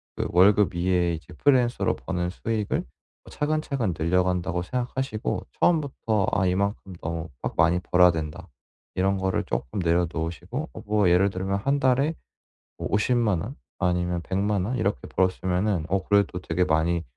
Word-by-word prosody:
그 - - -2
월급 100 +3 +5
이외에 85 0 +1
이제 85 +2 -8
프리랜서로 125 - +2
버는 90 0 -3
수익을 110 +1 -2
뭐 65 - -15
'차근차근 145 - -1
늘려간다.'고 90 +1 0
생각하시고 125 +1 -3
처음부터 135 - +1
'아 95 - +2
이만큼 100 +1 -1
너무 80 0 -4
막 - - -2
많이 85 +3 +4
벌어야 90 0 +5
된다.' 80 +2 -5 0.5
이런 95 +1 +1
거를 95 0 0
쪼끔 60 +5 -4
내려놓으시고 85 - -1
어 - - -8
뭐 105 -3 +2
예를 95 +3 +4
들면 95 +1 -2
1 140 +7 +1
달에 135 +4 +2 0.6
뭐 - - -3
500,000 105 -3 +2
원 125 +8 -7 0.2
아니면 90 -1 0
1,000,000 100 +1 0
원 120 +6 -2
이렇게 100 - -1
벌었으면은 95 0 0
어 95 0 +1
그래도 100 -4 +2
되게 90 0 -1
많이 85 +1 +1
95 Hz, 325 characters per minute, -25 LUFS, 90-110 Hz, 0.6 s, 월급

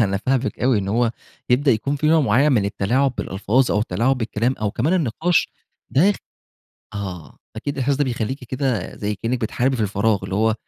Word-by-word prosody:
أنا 100 -1 0
فاهمِك 130 +5 -1
أوي 125 -3 +3
إن 95 - -3
هو 115 +3 +2 0.4
يبدأ 135 +3 +4
يكون 140 +6 0
في 150 - -1
نوع 160 0 +5
معيّن 135 +4 +3
من 105 -5 +2
التلاعب 120 +7 +1
بالألفاظ 110 +7 +1
أو 105 - +2
التلاعب 115 +7 +1
بالكلام، 115 +2 0
أو 105 -1 0
كمان 145 - 0
النقاش 165 +1 +1 0.4
ده 185 +9 +4
خ - - -9 0.8
آه، 95 -5 -6 0.2
أكيد 140 +6 -3
الأحساس 135 +1 +1
ده 145 - +1
بيخليكِ 125 +1 -3
كده 125 -5 -2
زي 105 0 -2
كأنِّك 115 +5 -2
بتحاربي 125 +4 0
في 110 - -1
الفراغ، 105 +1 +1
اللي 95 - -4
هو 110 +1 +2
120 Hz, 190 wpm, -21 LUFS, 105-135 Hz, 0.8 s, نوع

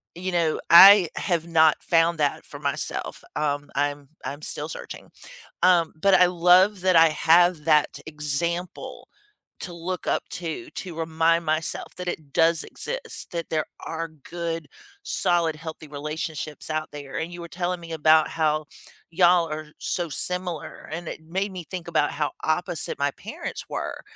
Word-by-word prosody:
you 185 +2 -4
know, 170 -3 +1
I 190 +1 +10
have 170 -3 -1
not 160 -2 +4
found 165 0 +2
that 145 -1 0
for - - -9
myself. - - -3
Um, 145 -1 -1
I'm 145 0 -2 0.2
I'm 145 +2 -5
still 150 +1 -4
searching. - - -9 0.5
Um, 175 -3 +4
but 200 +2 +3
I 180 - +7
love 180 +3 +4
that 185 -2 +3
I 165 0 +8
have 165 +1 +4
that 150 -2 +2
example 160 +4 -3 0.5
to 180 - -5
look 175 +1 -5
up - - 0
to, 175 - -5
to 180 -3 -7
remind 165 +1 +1
myself 155 +1 -2
that 180 0 -5
it 150 -5 -6
does 165 -1 +3
exist, - - -6
that 170 -1 -4
there 155 -1 0 0.2
are 165 0 -4
good, 165 +2 -6 0.4
solid, 170 -3 +1
healthy 160 0 -8
relationships 150 0 -5
out 155 0 -2
there. 140 -2 -8
And 165 +2 -4
you 175 - -8
were 170 - -8
telling 175 +1 -3
me 165 -1 -9
about 155 0 +4
how 155 -1 0 0.4
y'all 175 0 +4
are 155 0 -5
so 175 -1 -2
similar, 180 +2 -2
and 165 +1 -5
it - - -7
made 190 +5 -3
me 180 -2 -7
think 175 0 -7
about 155 -3 +1
how 145 -1 -2
opposite 170 0 -1
my 140 0 0
parents - - -7
were, - - -5
165 Hz, 160 wpm, -24 LUFS, 155-175 Hz, 0.5 s, I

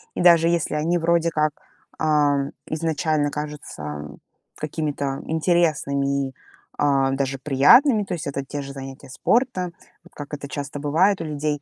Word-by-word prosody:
и - - -2
даже 170 -2 +6
если 170 -3 0
они 165 +3 +1
вроде 170 0 +2
как, 155 -1 +1 0.5
ам, 145 -3 +2 0.2
изначально 155 -1 0
кажутся 75 - -6 0.4
какими-то 145 -3 -3
интересными 150 -5 +1
и, - - -16 0.4
а, 135 -2 +2
даже 135 0 -1
приятными- 210 - +5
то - - -4
есть 165 -4 -4
это 140 -1 -3
те 145 +1 -5
же 140 0 -7
занятия 135 -1 -9
спортом, 185 - 0 0.3
вот - - -19
как 145 0 -9
это 145 -1 -5
часто 145 0 -5
бывает 170 +7 +2
у - - -4
людей. 150 -1 -2
150 Hz, 150 wpm, -23 LUFS, 140-165 Hz, 0.5 s, даже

